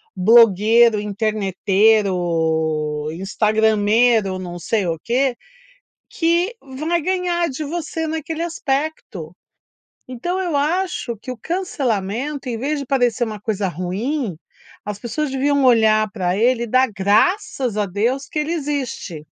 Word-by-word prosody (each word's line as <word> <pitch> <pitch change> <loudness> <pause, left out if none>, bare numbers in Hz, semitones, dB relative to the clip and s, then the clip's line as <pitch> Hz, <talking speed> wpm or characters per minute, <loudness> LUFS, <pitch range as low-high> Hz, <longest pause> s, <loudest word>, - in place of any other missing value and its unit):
blogueiro, 225 +2 +5
interneteiro, 185 -7 0
instagrameiro, 215 +2 +2
não 175 -1 -6
sei 200 +1 -1
o 165 -1 -2
quê. 255 +1 +1 0.8
Que 345 +6 +1
vai 310 +6 -2
ganhar 355 0 0
de 290 +3 -5
você 320 +1 -4
naquele 320 +1 -4
aspecto. 275 - -3 0.7
Então, 350 +10 -3
eu 345 -6 -1
acho 310 -5 -1
que 255 - -8
o 250 - -5
cancelamento, 280 - -2
em 230 -2 -3
vez 290 +3 -2
de 275 - -6
parecer 245 -2 +1
uma 215 -2 -6
coisa 205 -3 -2
ruim, 190 - -3 0.5
as 210 -1 -5
pessoas 265 +6 -3
deviam 280 +1 +1
olhar 215 -3 +4
pra 185 -3 -1
ele 235 +2 +2
e - - -5
dar 255 +3 +3
graças 220 - +1
a 205 -1 0
Deus 235 +9 -1
que 305 - -5
ele 310 +3 -2
existe. 275 - -4
235 Hz, 125 wpm, -20 LUFS, 200-290 Hz, 0.8 s, blogueiro